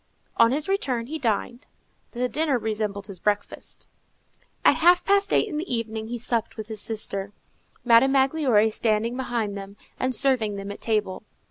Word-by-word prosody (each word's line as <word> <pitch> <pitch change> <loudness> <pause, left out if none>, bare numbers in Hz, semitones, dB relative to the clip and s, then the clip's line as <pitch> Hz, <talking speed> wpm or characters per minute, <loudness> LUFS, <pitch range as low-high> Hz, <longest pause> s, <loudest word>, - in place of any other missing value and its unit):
On 230 - +5
his 295 +3 -1
return, 270 - -1
he 315 +5 -5
dined. 240 +1 -2 0.5
The 250 +1 -1
dinner 300 0 0
resembled 210 -3 -3
his 195 -4 -10
breakfast. 205 +2 -3 0.8
At - - +6
half 350 +2 +4
past 400 0 +3
eight - - +3
in 300 - -4
the 325 +1 -4
evening 220 -2 -3
he 240 +1 -4
supped 230 -1 -2
with 220 0 -7
his 215 -2 -3
sister, 200 -3 -3 0.5
Madame 240 +3 +5
Magloire 265 -6 +3
standing 225 +2 0
behind 235 -5 -2
them 200 0 -9 0.2
and 255 0 0
serving 235 -6 +3
them 200 0 -6
at 205 - -10
table. 210 -4 -1
230 Hz, 165 wpm, -24 LUFS, 210-265 Hz, 0.8 s, At